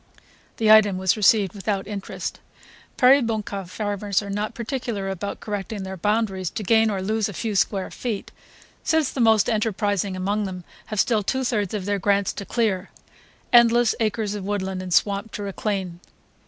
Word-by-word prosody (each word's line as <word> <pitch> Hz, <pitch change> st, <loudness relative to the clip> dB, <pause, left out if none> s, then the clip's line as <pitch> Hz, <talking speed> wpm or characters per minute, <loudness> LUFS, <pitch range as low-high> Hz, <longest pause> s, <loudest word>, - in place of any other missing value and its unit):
The 220 Hz, -1 st, +4 dB
item 210 Hz, -3 st, +6 dB
was 185 Hz, -1 st, +2 dB
received 205 Hz, -2 st, +3 dB
without 200 Hz, -1 st, -2 dB
interest. 200 Hz, -2 st, -5 dB, 0.6 s
Peribonka 225 Hz, -7 st, +3 dB
farmers 205 Hz, 0 st, -1 dB
are 200 Hz, -, -6 dB
not 205 Hz, +2 st, -3 dB
particular 235 Hz, -5 st, -3 dB
about 195 Hz, +1 st, -4 dB
correcting 205 Hz, -1 st, -4 dB
their 190 Hz, 0 st, -5 dB
boundaries 195 Hz, -1 st, 0 dB
to 215 Hz, -, -5 dB
gain 220 Hz, +3 st, +4 dB
or 195 Hz, -3 st, -2 dB
lose 215 Hz, +1 st, 0 dB
a -, -, -7 dB
few 220 Hz, +1 st, -3 dB
square 195 Hz, 0 st, 0 dB
feet, 225 Hz, -5 st, -4 dB, 0.5 s
since 320 Hz, -3 st, +1 dB
the 260 Hz, -, -2 dB
most 220 Hz, -2 st, +4 dB
enterprising 205 Hz, -3 st, 0 dB
among 200 Hz, +3 st, -1 dB
them 185 Hz, -2 st, -6 dB, 0.2 s
have 215 Hz, -, -3 dB
still 220 Hz, -1 st, +3 dB
two 260 Hz, +6 st, -1 dB
thirds 215 Hz, -5 st, -1 dB
of 195 Hz, -3 st, -4 dB
their 205 Hz, 0 st, 0 dB
grants 200 Hz, +1 st, +1 dB
to 200 Hz, -, -6 dB
clear, 205 Hz, -5 st, 0 dB, 0.6 s
endless 235 Hz, -1 st, +6 dB
acres 215 Hz, -2 st, -1 dB
of 205 Hz, -2 st, -5 dB
woodland 190 Hz, -2 st, -2 dB
and 185 Hz, -1 st, -7 dB
swamp 200 Hz, +4 st, +1 dB
to 205 Hz, -, -5 dB
reclaim. 195 Hz, -3 st, -3 dB
205 Hz, 170 wpm, -23 LUFS, 195-220 Hz, 0.6 s, item